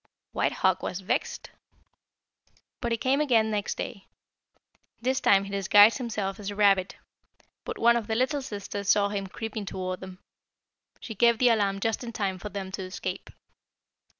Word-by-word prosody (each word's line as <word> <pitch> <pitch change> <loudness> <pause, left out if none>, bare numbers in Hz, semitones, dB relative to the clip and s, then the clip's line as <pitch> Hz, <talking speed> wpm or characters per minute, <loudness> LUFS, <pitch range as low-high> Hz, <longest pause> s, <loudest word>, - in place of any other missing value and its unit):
"White - - 0
Hawk 190 0 +3
was 180 - -4
vexed, 190 - -3 1.3
but 240 -2 -2
he 230 - +1
came 265 +5 +1
again 225 -7 +3
next 205 -1 -2
day. 195 - -6 0.9
This 260 +2 0
time 195 -1 +4
he 200 - -8
disguised 205 +4 +5
himself 215 -6 -3
as 205 -1 -5
a 205 - -6
rabbit, 195 -2 +3 0.7
but 465 -2 -5
one 235 - +4
of 230 -3 -2
the 220 - -1
little 265 +5 0
sisters 200 -4 -5
saw 200 -1 +4
him 200 -1 -3
creeping 220 +2 -5
toward 185 -1 -4
them. 185 -1 -10 0.8
She 225 - -7
gave 235 +2 +4
the 250 +1 +4
alarm 200 -3 +1
just 225 +3 -1
in 235 -1 -7
time 195 -4 -2
for 210 - -6
them 195 -1 -6
to 190 - -5
escape. 185 0 -5
205 Hz, 170 wpm, -27 LUFS, 195-235 Hz, 1.3 s, disguised